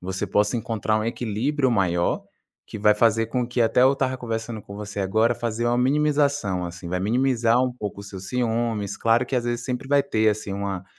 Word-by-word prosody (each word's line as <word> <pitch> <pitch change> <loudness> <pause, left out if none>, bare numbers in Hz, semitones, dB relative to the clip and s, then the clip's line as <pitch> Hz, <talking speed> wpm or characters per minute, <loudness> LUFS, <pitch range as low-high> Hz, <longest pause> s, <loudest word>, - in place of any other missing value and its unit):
você 95 +1 -3
possa 105 +3 +1
encontrar 110 -1 -1
um 110 - -2
equilíbrio 125 +5 -1
maior, 90 -6 +1 0.4
que - - -7
vai 105 +1 +4
fazer 115 +1 +3
com 125 +1 -1
que 120 0 -2
até 115 +2 +4
eu 130 +1 +6
estava 130 -1 -1
conversando 115 -2 -4
com 100 - -11
você 105 0 -5
agora, 110 +5 +2
fazer 120 0 -2
uma 120 0 +2
minimização, 140 -7 +1
assim, 85 +1 -9
vai 90 +1 -2
minimizar 120 +2 +2
um 125 -1 0
pouco 105 -4 -6
o - - -9
seu 100 -2 -8
ciúmes. 115 -1 -1
Claro 115 +2 +2
que 130 - -3
às 120 - 0
vezes 120 0 -2
sempre 125 +1 -4
vai 140 0 +4
ter, 110 -5 +1
assim, 105 -1 -2
uma 100 -2 -4
115 Hz, 210 wpm, -24 LUFS, 105-125 Hz, 0.4 s, eu